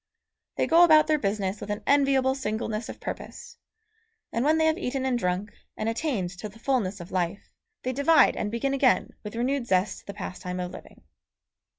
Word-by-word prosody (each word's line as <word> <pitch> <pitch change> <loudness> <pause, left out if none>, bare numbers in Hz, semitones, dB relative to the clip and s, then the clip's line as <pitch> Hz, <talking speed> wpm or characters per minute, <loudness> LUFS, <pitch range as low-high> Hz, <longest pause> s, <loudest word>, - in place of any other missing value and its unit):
They - - +1
go 335 +2 +6
about 310 -3 +7
their 305 -1 +2
business 200 -3 -2
with - - -7
an 205 0 -3
enviable 275 -2 +3
singleness 220 -3 -3
of - - -8
purpose, - - -7 0.8
and 230 - 0
when 310 +3 +3
they 320 - +3
have 315 +3 +2
eaten 265 -5 -2
and 260 -1 +1
drunk, 190 -1 -1 0.3
and 215 - -2
attained 225 - -1
to 215 - -5
the 210 - -16
fulness 225 -6 -1
of 175 +1 -10
life, 180 +1 -3 0.3
they 255 - -1
divide 285 +1 +5
and 205 - -2
begin 235 +5 -1
again 270 -2 +2
with 210 +1 -8
renewed 250 +1 -1
zest 190 0 0
the 200 - -5
pastime 185 -2 -5
of 180 0 -4
living. - - -13
235 Hz, 190 wpm, -26 LUFS, 200-275 Hz, 0.8 s, about